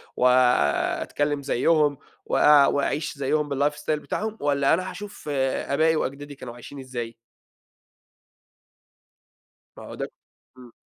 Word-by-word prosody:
وآآ، 125 - +3
أتكلّم 145 -1 -1
زيهم، 145 +2 +2 0.3
وآآ، 150 -1 +6
وأعيش 145 +2 -1
زيهم 145 +2 0
بالlife 145 +1 +1
style 150 - -4
بتاعهم، 220 +7 -4
والَّا 140 -1 +2
أنا 185 +3 0
هاشوف 200 -4 -9
آآ، 135 0 -1
آبائي 160 +3 +3
وأجدادي 145 0 -4
كانوا 125 -3 -9
عايشين 120 +4 -11
إزاي؟ 120 -3 -6 2.6
ما - - -10
هو - - -9
ده - - -5 0.5
امم. 125 -2 -14
140 Hz, 120 wpm, -24 LUFS, 130-150 Hz, 2.6 s, وآآ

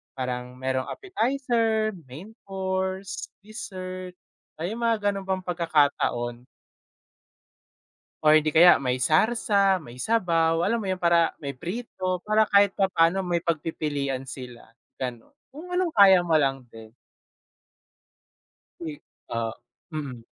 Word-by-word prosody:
Parang 125 -1 -4
merong 130 0 -1
appetizer, 235 - 0 0.2
main 155 - -10 0.2
course, 190 0 -3
dessert, 185 -4 -7 0.5
ah, - - -4
yung 225 +3 -5
mga 220 -3 +2
gano'n 195 -1 -5
bang 190 -1 -1
pagkakataon. 145 -8 0 1.8
Or 155 - +7
hindi 155 0 -1
kaya, 170 +3 +7
may 125 -2 0
sarsa, 195 - +3
may 125 -8 -10
sabaw, 165 - +2
alam 230 +4 +1
mo 205 - -5
yun, 185 - 0
para 170 -1 +3
may 140 -2 -5
prito. 185 - -4
Para 215 0 +3
kahit 200 -1 +5
papaano, 185 -2 +2
may 175 -2 -1
pagpipilian 145 -5 -2
sila, 125 -2 -9 0.3
ganun. 125 -3 -6 0.2
Kung 310 +6 -10
anong 360 -2 0
kaya 195 -5 +7
mo 170 - -2
lang 135 -2 0
din. 110 -1 -12 1.9
Eh, 155 -3 -6 0.3
ah, 115 -1 -2 0.4
mm. 140 -7 -6
175 Hz, 120 wpm, -25 LUFS, 135-200 Hz, 1.9 s, Or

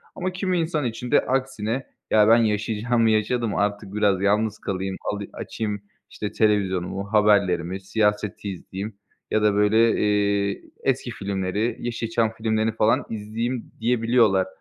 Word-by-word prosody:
Ama 185 0 -2
kimi 185 -1 -1
insan 160 -3 -1
için 120 +1 -4
de - - +6
aksine, 130 -2 -1 0.3
"Ya, 105 -1 +5
ben 115 +1 +7
yaşayacağımı 110 +1 +1
yaşadım, 110 0 +1
artık 100 -1 -1
biraz 100 -3 +2
yalnız 105 +1 +1
kalayım, 95 0 -3 0.2
ali 100 -1 -5
açayım, 105 -3 -4 0.3
işte, 105 - -5
televizyonumu, 100 -1 0
haberlerimi, 95 -4 +3
siyaset 105 0 -1
izleyeyim." 100 +2 -6 0.4
ya 110 - +2
da 105 -1 +3
böyle, 110 +3 +4
eee, 100 -1 +1 0.2
"Eski 130 -2 0
filmleri, 100 +2 -2
Yeşilçam 115 -1 -1
filmlerini 110 0 0
falan 110 0 +2
izleyeyim." 115 +3 -4
diyebiliyorlar. 115 -4 +3
105 Hz, 130 wpm, -24 LUFS, 100-115 Hz, 0.4 s, ben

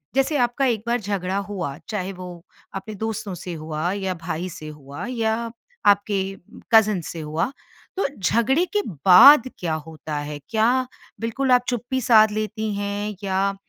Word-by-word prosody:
जैसे 270 +2 +2
आपका 245 +2 +1
एक 230 -4 0
बार 240 +1 +1
झगड़ा 195 -2 -2
हुआ, 190 -8 -4
चाहे 195 -3 -3
वो 180 -1 -8 0.4
अपने 210 +2 -6
दोस्तों 220 -1 -4
से 175 0 -7
हुआ 155 +2 -3
या 190 -1 -2
भाई 175 +2 -3
से 155 -2 -9
हुआ 150 - -8
या 230 -1 -1 0.3
आपके 200 0 +3 0.5
कज़िन्स 215 -6 +4
से 165 - -7
हुआ, 155 - -2 0.5
तो 390 - +1
झगड़े 235 - +2
के 415 - +2 0.2
बाद 255 +8 +9
क्या 165 -3 -2
होता 155 -1 -6
है? 145 0 -5
क्या 240 +3 +2 0.3
बिल्कुल 255 +4 -1
आप 250 -1 +5
चुप्पी 245 +2 -2
साध 220 -2 +6
लेती 215 0 -3
हैं? 205 +1 -3
या 195 +1 0
205 Hz, 160 wpm, -23 LUFS, 180-230 Hz, 0.5 s, बाद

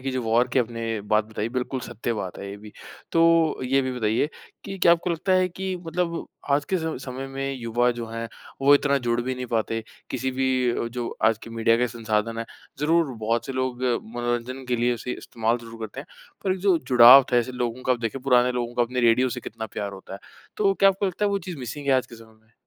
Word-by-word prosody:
की 135 +1 -3
जो 130 -1 -2
वॉर 115 +2 +2
के - - +3
आपने 115 -2 -2
बात 105 0 +4
बताई 110 0 -4
बिल्कुल 125 +1 -2
सत्य 120 0 -4
बात 95 -5 -5
है 100 - -6
ये 100 - -7
भी। 105 0 -12 0.4
तो 165 -1 +4
ये 135 +2 +2
भी 130 0 -2
बताइए 110 +5 +1 0.4
की, 195 -1 -6
क्या 170 - +6
आपको 170 +1 0
लगता 180 +3 0
है 185 0 +3
की 190 +1 -4
मतलब 170 0 -2 0.2
आज 145 +1 +3
के 185 - +4
स 160 -1 -3
समय 130 +1 -5
में 135 0 -3
युवा 120 0 +1
जो 115 - -4
हैं, 115 0 -5 0.3
वो 140 +1 +7
इतना 140 0 +2
जुड़ 120 -1 0
भी 130 +2 -2
नहीं 125 0 -5
पाते 115 -1 -1 0.3
किसी 130 0 -2
भी 130 -2 0
जो 120 -1 -3 0.2
आज 110 -1 +4
की - - -9
मीडिया 115 0 +2
के 125 +1 +2
संसाधन 115 -1 -2
हैं, 115 - -2 0.4
ज़रूर 160 -2 +2
बहुत 115 +3 -1
से 135 - -4
लोग 130 -1 -2 0.3
मनोरंजन 120 +2 -2
के 125 - +1
लिए 120 +1 +1
उसे 125 +2 -5
इस्तेमाल 115 +1 -1
ज़रूर 115 -1 -11
करते 110 -2 -6
हैं। - - -11 0.4
पर 190 - +2
एक 190 - -4
जो 190 -2 +4
जुड़ाव 125 +2 +9
था - - +5
ऐसे 120 +1 +1
लोगों 125 0 -3
का 130 - +2
आप 125 - -1
देखें 115 +3 -3
पुराने 125 -1 +4
लोगों 120 -1 -3
का 120 - +3
अपने 125 +1 -1
रेडियो 120 +2 +4
से 120 - -5
कितना 110 0 -6
प्यार 100 -1 -4
होता 95 0 -11
है। - - -8 0.4
तो 195 -2 +2
क्या 195 0 +5
आपको 195 +1 0
लगता 190 +3 -2
है 205 - +2
वो 200 - +1
चीज़ 180 -2 -7
मिसिंग 140 +3 -6
है, 140 - +4
आज 130 -1 +2
के 120 - -12
समय 110 -1 -16
में? 110 +1 -32
125 Hz, 245 wpm, -25 LUFS, 115-140 Hz, 0.4 s, जुड़ाव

